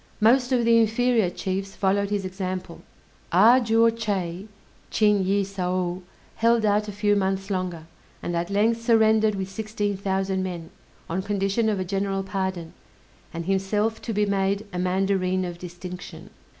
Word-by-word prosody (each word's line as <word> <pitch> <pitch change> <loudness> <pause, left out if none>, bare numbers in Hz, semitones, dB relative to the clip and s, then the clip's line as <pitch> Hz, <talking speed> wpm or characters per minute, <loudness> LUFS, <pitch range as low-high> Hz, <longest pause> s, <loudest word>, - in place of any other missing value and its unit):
Most 245 +4 +4
of 245 -2 +2
the 230 0 +5
inferior 230 -2 +2
chiefs 190 +2 -4
followed 200 0 +1
his 205 -2 -1
example. 185 -2 -5 0.5
A 220 +8 +6
juo 225 0 +4
Chay 195 -4 -3 0.4
(Ching 210 -2 +3
yĭh 200 +1 +1
saou) 185 -2 -2 0.4
held 230 -1 +3
out 210 0 +2
a - - -4
few 205 0 +1
months 195 0 -1
longer, 180 -4 -3 0.4
and 175 - -2
at 170 +1 -2
length 220 +3 +1
surrendered 220 -2 +3
with 190 -1 -3
sixteen 205 0 -3
thousand 190 0 -1
men, 175 -3 -5 0.4
on 185 +3 -2
condition 200 +2 0
of 205 -3 -1
a 185 - -2
general 195 +1 -1
pardon, 190 -3 -3 0.6
and 170 -1 -5
himself 205 +4 0
to 230 - -4
be 210 -1 +1
made 200 +1 0
a 180 - -3
mandarine 185 0 0
of 175 -1 -6
distinction. 180 +1 -9
195 Hz, 155 wpm, -25 LUFS, 185-215 Hz, 0.6 s, A